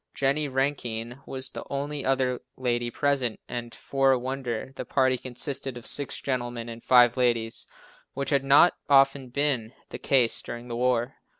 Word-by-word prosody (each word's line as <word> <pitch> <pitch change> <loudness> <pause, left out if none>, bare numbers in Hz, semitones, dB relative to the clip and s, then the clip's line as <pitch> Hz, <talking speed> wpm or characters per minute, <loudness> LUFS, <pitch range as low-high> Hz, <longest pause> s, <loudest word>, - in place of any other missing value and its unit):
Jennie 140 +2 +1
Rankine 130 -3 -2
was 130 0 -4
the - - -6
only 140 +1 -3
other 130 -2 0 0.2
lady 120 -2 -1
present 130 -2 0
and, 120 -1 -6
for 135 -1 +1
a 130 - +4
wonder, 130 -1 -4
the - - -4
party 130 -1 +2
consisted 130 +1 -4
of 120 - -10
six 145 -2 0
gentlemen 120 -3 -3
and 115 0 -8
five 125 0 +5
ladies, 115 -3 0 0.5
which 140 +2 -3
has 140 -1 +3
not 140 +6 +6 0.2
often 135 -1 +4
been 130 -4 0 0.2
the - - -7
case 125 -4 +2
during 120 +1 -8
the 120 - -3
war. 125 +1 0
130 Hz, 165 wpm, -26 LUFS, 120-135 Hz, 0.5 s, not